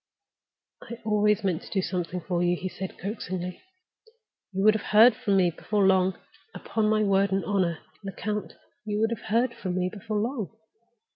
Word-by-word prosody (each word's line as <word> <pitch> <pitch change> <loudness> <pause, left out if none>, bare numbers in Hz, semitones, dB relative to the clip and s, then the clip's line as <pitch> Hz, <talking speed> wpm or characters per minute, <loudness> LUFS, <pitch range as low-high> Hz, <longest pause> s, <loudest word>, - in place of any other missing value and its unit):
"I 235 - -8
always 210 0 +2
meant 180 -4 0
to - - -12
do 190 -2 0
something 180 -1 -3
for 175 0 -1
you," 175 0 +2
he 185 - -4
said, 190 0 -7
coaxingly. 185 -3 -5 0.9
"You 195 0 -1
would 215 0 +7
have 220 - -4
heard 220 +3 +7
from 200 -2 +1
me 180 -2 +4
before 205 +4 0
long. 190 -1 +3 0.4
Upon 215 -1 -1
my 215 0 +3
word 195 -1 +3
and 195 0 0
honor, 185 -5 +1 0.3
Lecount, 205 +2 -4 0.3
you 210 -1 -2
would 225 +1 +2
have 230 - -5
heard 235 +3 +2
from 180 -2 -4
me 185 0 0
before 210 +1 -4
long!" 225 -1 -3
200 Hz, 180 wpm, -27 LUFS, 185-215 Hz, 0.9 s, would